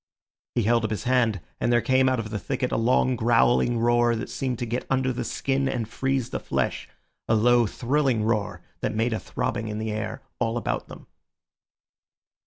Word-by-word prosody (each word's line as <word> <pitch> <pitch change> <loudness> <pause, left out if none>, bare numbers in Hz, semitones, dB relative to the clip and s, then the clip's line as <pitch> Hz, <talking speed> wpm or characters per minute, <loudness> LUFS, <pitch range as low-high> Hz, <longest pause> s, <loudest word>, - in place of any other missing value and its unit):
He 120 - +2
held 115 +2 +3
up 110 - 0
his 110 - -3
hand, 120 -6 +2 0.2
and 120 - +1
there 120 - +5
came 130 +2 +3
out 130 -2 0
of 110 -1 -5
the 105 - -2
thicket 125 +4 -2
a - - 0
long 125 +2 +2
growling 120 +1 +3
roar 120 0 +3
that 115 - -5
seemed 130 -3 -2
to 120 - -3
get 120 +2 -2
under 130 -1 +1
the 120 0 -3
skin 135 +3 -1
and 115 -4 -2
freeze 135 +1 -1
the - - -2
flesh—a 110 - -3
low 120 +1 +4
thrilling 130 0 0
roar 110 -2 -1 0.2
that 110 - -2
made 115 +2 +1
a 110 - -1
throbbing 115 -1 -3
in 105 0 -4
the 110 0 -3
air 110 0 -4 0.2
all 115 -1 0
about - - -2
them. - - -12
120 Hz, 190 wpm, -25 LUFS, 110-125 Hz, 0.2 s, there